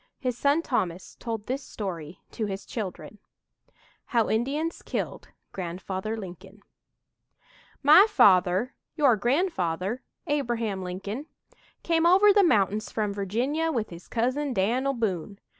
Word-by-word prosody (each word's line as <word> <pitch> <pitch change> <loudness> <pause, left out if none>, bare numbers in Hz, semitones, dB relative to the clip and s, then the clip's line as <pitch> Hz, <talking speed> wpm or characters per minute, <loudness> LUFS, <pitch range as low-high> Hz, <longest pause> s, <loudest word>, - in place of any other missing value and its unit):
His 250 -3 -2
son 285 +6 +2
Thomas 185 - -2
told 225 -3 -4
this 265 +2 -3
story 175 -8 -6
to 220 - -3
his 195 0 -5
children: 210 -1 -6 0.9
HOW 230 -3 +1
INDIANS 285 +9 -1
KILLED - - -4 0.2
"GRANDFATHER 190 +4 -4
LINCOLN" 195 +1 -10 1.2
"My 310 +9 +8
father 190 - +4 0.2
your 280 -7 +4
grandfather, 225 - 0 0.2
Abraham 235 - -1
Lincoln 195 - -5 0.6
come 330 0 +3
over 395 +3 +6
the 410 - +6
mountains 210 - +2
from 210 -2 -1
Virginia 250 - -1
with 230 -9 -2
his 170 0 -11
cousin, 255 +4 -1
Dan'l 245 +8 +1
Boone. 200 -4 -2
225 Hz, 120 wpm, -27 LUFS, 190-275 Hz, 1.2 s, My